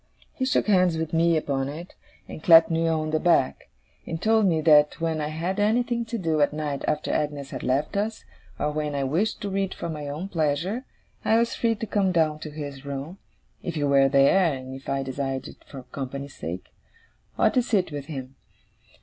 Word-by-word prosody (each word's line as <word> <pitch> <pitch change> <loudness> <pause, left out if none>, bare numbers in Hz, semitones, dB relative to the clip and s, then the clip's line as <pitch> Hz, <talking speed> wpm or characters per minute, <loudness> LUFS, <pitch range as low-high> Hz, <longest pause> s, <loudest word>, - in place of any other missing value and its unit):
He 260 - -2
shook 260 - +2
hands 185 -5 +3
with 160 0 -3
me 165 0 +3
upon 140 -3 -1
it, 165 +5 -8 0.3
and - - -9
clapped 165 0 +7
me 165 0 +1
on 155 -1 0
the 155 - +1
back; 170 -7 +1 0.4
and 165 - -3
told 220 +1 +3
me 165 -3 +2
that 150 -1 +5
when 165 -1 -1
I 150 - -1
had 170 +6 -3
anything 235 +3 +1
to 230 +1 -4
do 160 -6 0
at 145 - +3
night 150 -2 -3
after 150 0 -1
Agnes 145 -2 -2
had 130 - -5
left 140 +9 0
us, 215 +2 -2 0.3
or 150 - -1
when 150 -1 -2
I 140 - 0
wished 170 +11 0
to 205 - -2
read 195 0 -1
for 170 - -5
my 150 -2 -5
own 150 +7 -4
pleasure, 170 - -1 0.4
I 225 - +3
was 235 0 +1
free 230 -1 +1
to 220 - -4
come 200 -3 +1
down 155 -3 +1
to 155 - -7
his 145 -2 -7
room, 140 +6 -6 0.4
if 170 - -4
he 150 - -1
were 140 -1 +4
there 150 +6 +4
and 130 0 -8
if 135 0 -9
I 135 0 0
desired 135 0 -3
it - - -14
for 135 -2 -9
company's 140 +2 -6
sake, 90 +3 -7 0.6
and - - +3
to 250 - +4
sit 205 -8 0
with 145 -1 -5
him. 135 -4 -7
155 Hz, 210 wpm, -25 LUFS, 140-185 Hz, 0.6 s, clapped